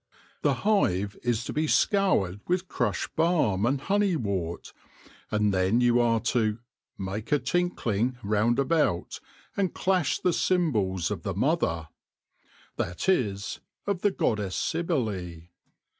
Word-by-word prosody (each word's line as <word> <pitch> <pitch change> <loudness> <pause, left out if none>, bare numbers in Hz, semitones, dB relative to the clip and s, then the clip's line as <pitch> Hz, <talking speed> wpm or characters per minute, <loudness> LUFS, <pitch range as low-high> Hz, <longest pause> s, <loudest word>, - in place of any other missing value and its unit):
The - - +2
hive 105 - +2
is 120 -1 0
to - - -4
be 155 +1 0
scoured 155 - +2
with 180 +1 0
crushed - - -2
balm 150 - +2
and 135 +2 +1
honey 200 +3 +1
wort, 95 - -3 0.6
and 105 -1 +1
then 95 +5 +2
you 120 0 +4
are 115 -1 +3
to 110 -3 +1 0.2
" - - -57
make 100 +5 -5
a 150 - +5
tinkling 130 - 0
round 105 +3 +2
about, 140 - +1 0.4
and 195 -3 -1
clash 185 -4 +1
the 180 -2 +1
cymbals 105 - +1
of - - -3
the - - -3
Mother 80 -1 0 0.3
" - - -43
— - - -29
that 85 - -3
is, 105 - 0 0.3
of 200 -3 -1
the 205 - +4
goddess 105 - -1
Cybele. 110 - -2
120 Hz, 145 wpm, -27 LUFS, -, 0.6 s, a